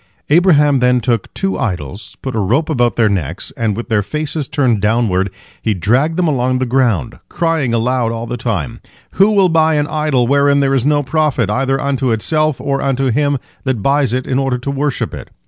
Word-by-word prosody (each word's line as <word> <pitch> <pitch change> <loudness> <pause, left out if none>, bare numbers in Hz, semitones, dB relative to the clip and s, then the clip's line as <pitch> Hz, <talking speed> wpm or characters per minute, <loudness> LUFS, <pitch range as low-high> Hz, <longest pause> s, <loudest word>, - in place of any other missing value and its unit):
Abraham 150 -5 +4
then 125 0 +3
took 115 0 -1
two 195 0 -2
idols, 95 - -4
put 130 -3 -4
a - - 0
rope 125 +11 0
about 120 -6 +1
their 115 -2 +3
necks, 95 -9 -3
and, 110 -3 -1
with 120 - -5
their 110 -2 +2
faces 150 +4 -3
turned 125 -9 +1
downward, 105 -3 +1 0.3
he 110 -2 0
dragged 130 - +1
them 180 -2 +2
along 130 -3 +1
the 130 - -1
ground, 120 - 0
crying 165 -7 0
aloud 115 0 0
all 115 0 -4
the 120 +1 -4
time: 115 -1 -3 0.3
"Who 195 +2 +4
will 200 -3 +4
buy 160 -2 +2
an 145 -1 +1
idol 150 -5 0
wherein 140 +2 +3
there 135 -1 +1
is 135 0 +1
no 145 -1 +2
profit, 140 -7 0
either 135 +3 0
unto 135 -2 -1
itself 155 +6 0
or 140 -1 -1
unto 135 -1 0
him 145 +3 +1 0.3
that 130 -7 -2
buys 140 -3 +2
it 130 +1 -1
in 130 0 0
order 135 -2 0
to 130 +3 -4
worship 140 0 -2
it? - - -8
130 Hz, 200 wpm, -16 LUFS, 115-145 Hz, 0.3 s, Abraham